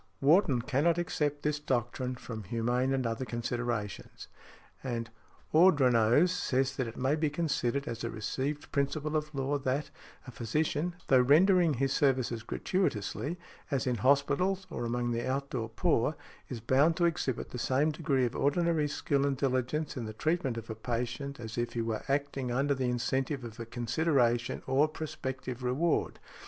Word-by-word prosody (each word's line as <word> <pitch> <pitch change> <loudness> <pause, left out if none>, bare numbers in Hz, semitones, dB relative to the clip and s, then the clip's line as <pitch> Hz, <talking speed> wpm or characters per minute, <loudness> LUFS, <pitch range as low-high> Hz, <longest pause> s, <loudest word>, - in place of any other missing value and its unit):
Wharton 140 - +4
cannot 145 +6 +2
accept 150 -4 -1
this 150 0 0
doctrine 125 -2 -1
from 115 -3 -7
humane 120 +5 0
and 130 -2 0
other 115 +2 -2
considerations. 120 -3 -4 0.6
And 115 -3 -3 0.4
Ordronaux 140 -6 +5
says 135 -7 0
that 130 - -1
it 115 - -8
may 130 +3 +1
be 155 -1 +1
considered 140 -4 -1
as 115 0 -4
a 115 - -1
received 135 +7 -3
principle 150 +2 -1
of 150 -1 -2
law 140 +2 0
that, 135 +2 -2 0.3
a 125 - -8
physician, 155 +8 -1
though 130 -2 +5
rendering 165 +4 +5
his 135 +2 0
services 130 -5 +1
gratuitously, 140 - -2 0.3
as 140 -3 0
in 125 -2 0
hospitals 140 - +2
or 120 - -3
among 120 +1 -1
the 120 +2 -2
out 140 +1 -2
door 115 -3 -3
poor, 115 +5 +1 0.3
is 120 -4 -5
bound 145 +8 +3
to 175 - +3
exhibit 155 -7 -1
the 125 - -5
same 140 +6 +2
degree 145 -4 +1
of 120 - -3
ordinary 160 +1 +2
skill 140 -1 0
and 140 -1 0
diligence 135 +3 -1
in 120 -4 -4
the 110 - -6
treatment 145 -1 -1
of 115 -1 -6
a - - -2
patient 120 +5 -4
as 110 0 -5
if 120 - -2
he 120 - -1
were 115 -1 -2
acting 140 -2 -1
under 140 +3 +1
the 130 -1 -2
incentive 130 +2 -1
of 115 0 -9
a 115 - -6
consideration 120 -1 +1
or 135 +3 +3
prospective 135 -5 -5
reward. 135 +7 0
135 Hz, 165 wpm, -30 LUFS, 120-150 Hz, 0.6 s, Ordronaux